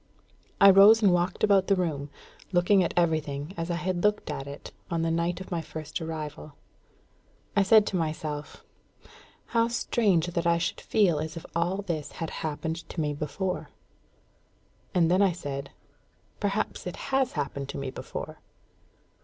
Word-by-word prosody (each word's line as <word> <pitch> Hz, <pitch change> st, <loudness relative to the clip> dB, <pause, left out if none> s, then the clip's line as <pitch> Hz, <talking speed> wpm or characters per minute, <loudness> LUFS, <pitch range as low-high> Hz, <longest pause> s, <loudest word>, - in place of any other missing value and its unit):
I 200 Hz, 0 st, +9 dB
rose 210 Hz, +4 st, +7 dB
and 195 Hz, -3 st, +6 dB
walked 175 Hz, +1 st, 0 dB
about 200 Hz, -2 st, +4 dB
the 195 Hz, -, +4 dB
room, 155 Hz, -6 st, -2 dB, 0.4 s
looking 180 Hz, +2 st, +4 dB
at 170 Hz, -, -2 dB
everything 155 Hz, -2 st, 0 dB
as 165 Hz, +1 st, -4 dB
I 175 Hz, -, 0 dB
had 180 Hz, 0 st, -2 dB
looked 210 Hz, -6 st, +1 dB
at 140 Hz, -1 st, -5 dB
it 140 Hz, +1 st, -9 dB, 0.2 s
on 165 Hz, -2 st, -1 dB
the 165 Hz, -, +1 dB
night 170 Hz, +2 st, 0 dB
of 190 Hz, -, -9 dB
my 170 Hz, -2 st, -1 dB
first 155 Hz, +1 st, -6 dB
arrival. 155 Hz, -2 st, -6 dB, 1.0 s
I 200 Hz, -, +5 dB
said 210 Hz, +2 st, +6 dB
to 195 Hz, -, -3 dB
myself, 155 Hz, -3 st, -3 dB, 0.8 s
"How 230 Hz, -1 st, +2 dB
strange 215 Hz, -7 st, +1 dB
that 170 Hz, -1 st, -1 dB
I 170 Hz, 0 st, +4 dB
should 170 Hz, -, -2 dB
feel 185 Hz, -8 st, +2 dB
as 155 Hz, +2 st, -4 dB
if 165 Hz, -, -8 dB
all 180 Hz, +4 st, 0 dB
this 160 Hz, -6 st, -4 dB
had 165 Hz, -, -5 dB
happened 160 Hz, +1 st, -3 dB
to -, -, -6 dB
me 150 Hz, -2 st, 0 dB
before!" 155 Hz, +6 st, -3 dB, 1.3 s
And 170 Hz, -2 st, +4 dB
then 185 Hz, +2 st, +4 dB
I 195 Hz, -3 st, +4 dB
said, 140 Hz, -5 st, -5 dB, 0.7 s
"Perhaps 205 Hz, -2 st, -2 dB
it 180 Hz, -, -5 dB
has 270 Hz, -2 st, 0 dB
happened 140 Hz, -2 st, -3 dB
to -, -, -5 dB
me 135 Hz, -1 st, -4 dB
before." -, -, -7 dB
170 Hz, 165 wpm, -27 LUFS, 155-190 Hz, 1.3 s, I